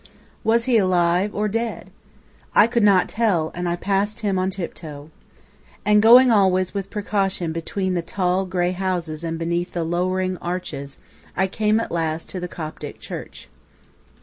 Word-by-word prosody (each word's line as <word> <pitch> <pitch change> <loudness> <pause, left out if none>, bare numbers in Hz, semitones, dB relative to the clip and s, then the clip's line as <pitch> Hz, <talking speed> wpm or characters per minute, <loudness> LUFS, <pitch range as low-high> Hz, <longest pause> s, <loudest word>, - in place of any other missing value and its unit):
Was 230 +1 +3
he 245 -3 +4
alive 180 +1 +2
or 210 +1 0
dead? 230 +2 -3 0.6
I 205 - +8
could 235 0 0
not 200 -3 +4
tell, 195 -9 0
and 175 0 -3
I 170 - 0
passed 200 +4 -1
him 200 -3 0
on 185 +1 0
tiptoe. 160 -5 -7 0.7
And 210 0 +5
going 245 +3 +8
always 185 -3 +3
with 195 -1 -4
precaution 195 -4 -1
between 185 +3 -2
the 175 - 0
tall, 185 +2 -1
grey 180 -1 0
houses 175 -4 -2
and 165 0 -3
beneath 170 +2 -2
the 170 - -1
lowering 185 +2 -1
arches, 175 -6 -5 0.4
I 190 - +3
came 215 +3 +1
at 230 - -4
last 160 -1 -2
to 185 - -4
the 180 - -4
Coptic 155 -3 -7
church. - - -8
185 Hz, 160 wpm, -22 LUFS, 170-205 Hz, 0.7 s, I